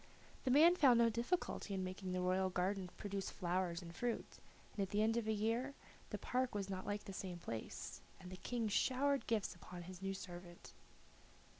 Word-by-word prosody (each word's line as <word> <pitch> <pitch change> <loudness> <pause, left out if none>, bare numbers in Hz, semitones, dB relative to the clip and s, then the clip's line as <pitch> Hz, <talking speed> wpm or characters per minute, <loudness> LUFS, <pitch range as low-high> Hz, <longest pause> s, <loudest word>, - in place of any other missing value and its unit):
The - - +2
man 315 +7 +8
found 270 -8 +7
no 230 -1 +5
difficulty 235 - -1
in 190 - -1
making 185 0 -4
the 180 0 0
royal 185 +1 +2
garden 185 +1 0
produce 200 -2 -3
flowers 180 -1 -1
and 170 0 -9
fruit, 240 -1 -2 0.3
and 205 - -2
at 195 - 0
the 205 +2 +2
end 225 +1 +3
of 235 -2 0
a - - +3
year 230 +6 0 0.3
the - - -2
park 250 -2 0
was 200 -1 -2
not 185 -1 -4
like 205 0 -1
the 195 - -7
same 185 -2 -4
place, 115 -10 -5 0.2
and 180 - -9
the 185 - -6
King 235 +3 -1
showered 270 +6 +2
gifts 220 -6 +1
upon 175 0 -9
his 185 +1 -9
new 195 0 -1
servant. 175 -2 -9
195 Hz, 195 wpm, -39 LUFS, 185-235 Hz, 0.3 s, man